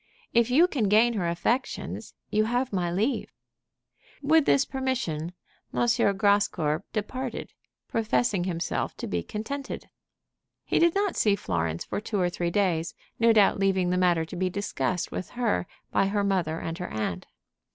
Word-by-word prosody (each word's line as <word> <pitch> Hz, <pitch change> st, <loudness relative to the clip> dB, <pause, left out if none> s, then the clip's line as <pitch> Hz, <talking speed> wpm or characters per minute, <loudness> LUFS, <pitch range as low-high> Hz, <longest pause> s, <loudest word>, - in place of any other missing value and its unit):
If 235 Hz, 0 st, +4 dB
you 310 Hz, +8 st, +5 dB
can 265 Hz, -11 st, 0 dB
gain 225 Hz, +3 st, +5 dB
her 190 Hz, -6 st, -1 dB
affections, 230 Hz, +10 st, -2 dB, 0.2 s
you 215 Hz, +1 st, +3 dB
have 245 Hz, +1 st, -1 dB
my 180 Hz, -2 st, 0 dB
leave." 215 Hz, +10 st, 0 dB, 0.9 s
With 310 Hz, +1 st, +4 dB
this 275 Hz, -, +4 dB
permission 235 Hz, -, -2 dB, 0.4 s
M. 240 Hz, -, +1 dB, 0.3 s
Grascour 195 Hz, -7 st, +2 dB
departed, 245 Hz, +4 st, -4 dB, 0.3 s
professing 220 Hz, -4 st, +1 dB
himself 170 Hz, -2 st, -2 dB
to -, -, -4 dB
be 85 Hz, -, -1 dB
contented. 270 Hz, -, -6 dB, 0.7 s
He -, -, +1 dB
did 340 Hz, +1 st, +4 dB
not 400 Hz, -1 st, +1 dB
see 205 Hz, -2 st, +3 dB
Florence 85 Hz, -, -2 dB
for -, -, -3 dB
two 210 Hz, -1 st, -2 dB
or 175 Hz, -1 st, +1 dB
three 175 Hz, 0 st, -1 dB
days, 170 Hz, -4 st, 0 dB, 0.2 s
no 230 Hz, 0 st, +5 dB
doubt 210 Hz, -3 st, +4 dB
leaving 190 Hz, -2 st, +2 dB
the -, -, +2 dB
matter 175 Hz, -3 st, +3 dB
to 165 Hz, -, -9 dB
be 185 Hz, +1 st, 0 dB
discussed 180 Hz, -2 st, -2 dB
with 185 Hz, -, -5 dB
her 230 Hz, -7 st, 0 dB, 0.2 s
by 195 Hz, -, +3 dB
her 205 Hz, +1 st, 0 dB
mother 180 Hz, -5 st, 0 dB
and 165 Hz, +2 st, -5 dB
her 180 Hz, -, -4 dB
aunt. 100 Hz, -5 st, -3 dB
200 Hz, 160 wpm, -27 LUFS, 175-235 Hz, 0.9 s, you